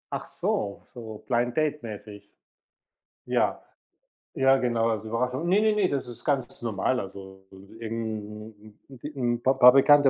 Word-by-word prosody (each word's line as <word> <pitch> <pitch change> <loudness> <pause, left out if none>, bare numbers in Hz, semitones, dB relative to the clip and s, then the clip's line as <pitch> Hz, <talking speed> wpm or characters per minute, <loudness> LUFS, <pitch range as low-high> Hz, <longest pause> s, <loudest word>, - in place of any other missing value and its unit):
Ach - - -6
so, 100 -1 -2
so 110 -3 -9
Blind 120 0 0
Date 150 -1 +1
mäßig. 105 -2 -10 0.9
Ja. - - +1 0.7
Ja, 135 -2 +4
genau, 120 -3 +1
als 110 -1 -2
Überraschung. 125 +7 -2
Ne, 195 +4 +4
ne, 215 -1 +3
ne, 205 -3 +3
das 140 -3 -2
ist 120 -1 -10
ganz 135 -4 -1
normal. 115 +3 0
Also, 95 -2 -9 0.3
irgend 110 -1 -5 0.4
'n 130 - -12 0.3
'n 120 - -4
Pa 130 - +4
Paar 125 -1 +8
Bekannte 145 +1 +6
120 Hz, 150 wpm, -26 LUFS, 110-135 Hz, 0.9 s, Paar